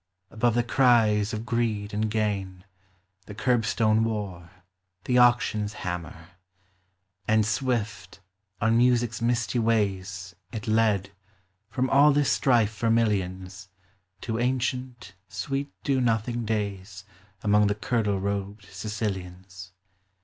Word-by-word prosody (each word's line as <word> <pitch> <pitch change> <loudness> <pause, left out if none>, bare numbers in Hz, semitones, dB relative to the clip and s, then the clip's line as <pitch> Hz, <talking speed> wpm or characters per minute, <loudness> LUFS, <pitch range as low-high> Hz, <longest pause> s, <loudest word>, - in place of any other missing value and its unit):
Above 120 +1 +1
the 120 - +2
cries 115 -4 +3
of 110 +1 -4
greed 115 -4 -1
and 110 +1 0
gain, 100 -4 -2 0.6
The 105 - -9
curbstone 110 -2 +2
war, 100 -6 -4 0.5
the 125 -1 +2
auction's 115 -4 +3
hammer; 85 -2 -6 1.0
And 110 0 +3
swift, 105 -4 -2 0.4
on 115 +2 +2
Music's 120 -2 +2
misty 120 +1 0
ways, 100 -4 -1 0.2
It 110 -2 -6
led, 110 -3 +2 0.6
from 130 +3 -1
all 145 +2 +6
this 145 -1 +2
strife 115 -5 +2
for 115 +2 -1
millions, 95 -3 -1 0.5
To 115 -1 -3
ancient, 125 -4 -2
sweet 135 +9 -3
do 135 -2 +1
nothing 115 0 0
days 100 -3 -4 0.4
Among 105 0 +4
the 105 - 0
kirtle 105 -3 0
robed 100 +1 -4
Sicilians. 95 -2 -6
110 Hz, 115 wpm, -26 LUFS, 100-120 Hz, 1.0 s, all